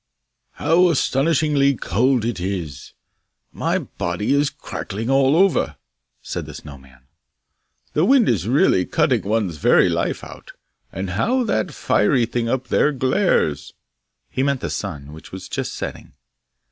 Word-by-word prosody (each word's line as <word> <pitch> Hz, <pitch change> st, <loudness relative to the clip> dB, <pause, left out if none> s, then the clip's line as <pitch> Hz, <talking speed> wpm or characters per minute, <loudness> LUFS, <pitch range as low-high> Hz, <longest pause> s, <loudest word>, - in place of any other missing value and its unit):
'How 180 Hz, +2 st, +3 dB
astonishingly 145 Hz, -1 st, +2 dB
cold 120 Hz, +4 st, +1 dB
it 120 Hz, -5 st, -2 dB
is! 90 Hz, -6 st, -5 dB, 0.6 s
My -, -, -1 dB
body 90 Hz, +8 st, -2 dB
is 140 Hz, 0 st, +2 dB
cracking 110 Hz, +6 st, -5 dB
all 135 Hz, +1 st, +4 dB
over!' 175 Hz, -, +2 dB, 0.5 s
said -, -, -5 dB
the -, -, -9 dB
Snow 70 Hz, -3 st, -10 dB
man. 65 Hz, -2 st, -20 dB, 0.9 s
'The 155 Hz, -, +2 dB
wind 260 Hz, +1 st, +4 dB
is 105 Hz, -4 st, 0 dB
really 130 Hz, -, +3 dB
cutting 140 Hz, -8 st, +1 dB
one's 100 Hz, -5 st, -1 dB
very -, -, +4 dB
life -, -, -2 dB
out! -, -, -11 dB, 0.4 s
And 95 Hz, -1 st, -4 dB
how 245 Hz, -, +1 dB
that 185 Hz, -6 st, -1 dB
fiery 120 Hz, +3 st, +2 dB
thing 115 Hz, 0 st, -2 dB
up 130 Hz, 0 st, -2 dB
there 150 Hz, -, +3 dB
glares!' 130 Hz, -, 0 dB, 0.6 s
He 130 Hz, -, -1 dB
meant 140 Hz, -1 st, 0 dB
the -, -, -3 dB
sun, 70 Hz, +1 st, -5 dB
which 80 Hz, -, -13 dB
was 95 Hz, -, -8 dB
just -, -, -3 dB
setting. -, -, -7 dB
125 Hz, 145 wpm, -21 LUFS, 95-145 Hz, 0.9 s, all